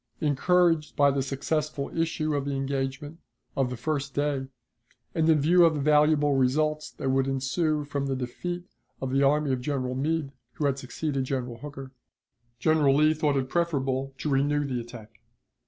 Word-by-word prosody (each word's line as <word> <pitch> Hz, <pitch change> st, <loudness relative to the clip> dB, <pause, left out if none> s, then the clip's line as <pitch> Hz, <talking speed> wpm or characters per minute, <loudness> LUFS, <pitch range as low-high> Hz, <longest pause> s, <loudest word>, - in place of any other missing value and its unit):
Encouraged 165 Hz, +2 st, +2 dB
by 140 Hz, -1 st, +4 dB
the 135 Hz, 0 st, 0 dB
successful 140 Hz, +2 st, -2 dB
issue 165 Hz, -2 st, 0 dB
of 140 Hz, -1 st, -1 dB
the 140 Hz, -1 st, -2 dB
engagement 135 Hz, +3 st, -3 dB, 0.4 s
of 135 Hz, -2 st, +1 dB
the 125 Hz, -, -5 dB
first 140 Hz, +1 st, -3 dB
day, 145 Hz, -2 st, -1 dB, 0.7 s
and 160 Hz, -1 st, +2 dB
in 155 Hz, -2 st, +5 dB
view 175 Hz, +5 st, +5 dB
of 165 Hz, -2 st, +4 dB
the -, -, -2 dB
valuable 150 Hz, 0 st, +4 dB
results 150 Hz, +4 st, +1 dB
that 135 Hz, -, -3 dB
would 135 Hz, 0 st, +2 dB
ensue 150 Hz, +3 st, 0 dB
from 140 Hz, -1 st, -3 dB
the 135 Hz, -, -1 dB
defeat 175 Hz, +8 st, -4 dB, 0.4 s
of 130 Hz, -1 st, -3 dB
the 135 Hz, +1 st, +2 dB
army 145 Hz, 0 st, +3 dB
of 125 Hz, -, -2 dB
General 130 Hz, -2 st, -2 dB
Meade 145 Hz, +2 st, -1 dB, 0.2 s
(who 150 Hz, -, -2 dB
had 140 Hz, -1 st, +1 dB
succeeded 135 Hz, +1 st, -3 dB
General 125 Hz, -3 st, -3 dB
Hooker), 135 Hz, -1 st, -8 dB, 0.7 s
General 150 Hz, -3 st, +3 dB
Lee 155 Hz, +2 st, +4 dB
thought 150 Hz, -2 st, +1 dB
it 130 Hz, -1 st, -1 dB
preferable 135 Hz, -4 st, -1 dB
to -, -, -4 dB
renew 145 Hz, +2 st, +2 dB
the 130 Hz, -3 st, -2 dB
attack. 115 Hz, -3 st, -12 dB
140 Hz, 170 wpm, -27 LUFS, 135-155 Hz, 0.7 s, in